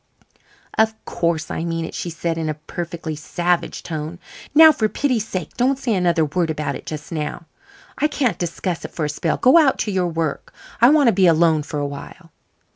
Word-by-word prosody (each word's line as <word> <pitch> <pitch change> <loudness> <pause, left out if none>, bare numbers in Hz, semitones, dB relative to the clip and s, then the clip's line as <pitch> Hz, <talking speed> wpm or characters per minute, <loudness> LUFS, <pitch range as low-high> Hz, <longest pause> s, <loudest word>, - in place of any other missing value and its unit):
"Of 220 0 +3
course 170 -2 -1
I - - -3
mean 165 -1 -2
it," - - -8
she 175 - -4
said, 165 0 -3
in 160 -1 -2
a 155 - -2
perfectly 165 +1 -6
savage 175 +3 -1
tone. 155 +1 -5 0.4
"Now, 320 +1 +10
for 220 -7 0
pity's 245 -6 0
sake, 180 -5 -5
don't 260 +2 +2
say 250 -4 -1
another 175 -4 +2
word 165 +2 -1
about 150 -3 -2
it - - -10
just 150 +1 -7
now. 155 +1 -4 0.5
I 300 - +3
can't 255 - -1
discuss 175 0 -3
it - - -5
for 155 - -3
a - - -2
spell. 155 +2 -1
Go 260 +7 +6
out 285 -5 +3
to 210 - -2
your 185 -2 +1
work. 165 -3 -3 0.3
I 240 - +8
want 290 -4 +5
to - - +2
be 190 -1 +4
alone 165 -1 +4
for 145 0 -5
awhile." 145 +4 -7
170 Hz, 200 wpm, -21 LUFS, 160-215 Hz, 0.5 s, Now